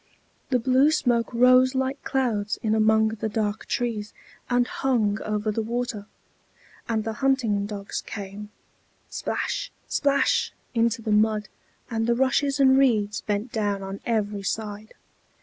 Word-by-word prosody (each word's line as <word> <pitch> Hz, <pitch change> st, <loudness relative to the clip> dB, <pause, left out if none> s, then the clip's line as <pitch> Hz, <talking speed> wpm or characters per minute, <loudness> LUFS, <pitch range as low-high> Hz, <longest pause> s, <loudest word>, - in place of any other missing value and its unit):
The 255 Hz, -, +3 dB
blue 260 Hz, +4 st, +4 dB
smoke 240 Hz, -6 st, +1 dB
rose 255 Hz, +2 st, +5 dB
like 265 Hz, +1 st, -1 dB
clouds 225 Hz, -6 st, -1 dB
in 220 Hz, -1 st, +1 dB
among 220 Hz, 0 st, +4 dB
the 220 Hz, 0 st, -3 dB
dark 210 Hz, 0 st, -2 dB
trees, 225 Hz, -4 st, -2 dB, 0.4 s
and 245 Hz, 0 st, +3 dB
hung 225 Hz, -6 st, 0 dB
over 215 Hz, 0 st, -1 dB
the 225 Hz, -, -1 dB
water; 235 Hz, -2 st, -3 dB, 0.8 s
and 220 Hz, -2 st, 0 dB
the 225 Hz, 0 st, -3 dB
hunting 235 Hz, -7 st, +1 dB
dogs 200 Hz, -1 st, -5 dB
came 205 Hz, 0 st, -7 dB, 0.6 s
splash, -, -, -3 dB, 0.2 s
splash! 280 Hz, -1 st, +1 dB, 0.2 s
into 230 Hz, -1 st, +1 dB
the 215 Hz, -, -2 dB
mud, 210 Hz, 0 st, +2 dB, 0.4 s
and 225 Hz, 0 st, -1 dB
the 235 Hz, -, +3 dB
rushes 270 Hz, +2 st, +1 dB
and 265 Hz, -1 st, +6 dB
reeds 215 Hz, -6 st, +2 dB
bent 210 Hz, +3 st, -2 dB
down 205 Hz, -3 st, -1 dB
on 195 Hz, +1 st, -6 dB
every 210 Hz, -3 st, -1 dB
side. 210 Hz, +1 st, -4 dB
225 Hz, 140 wpm, -25 LUFS, 210-255 Hz, 0.8 s, and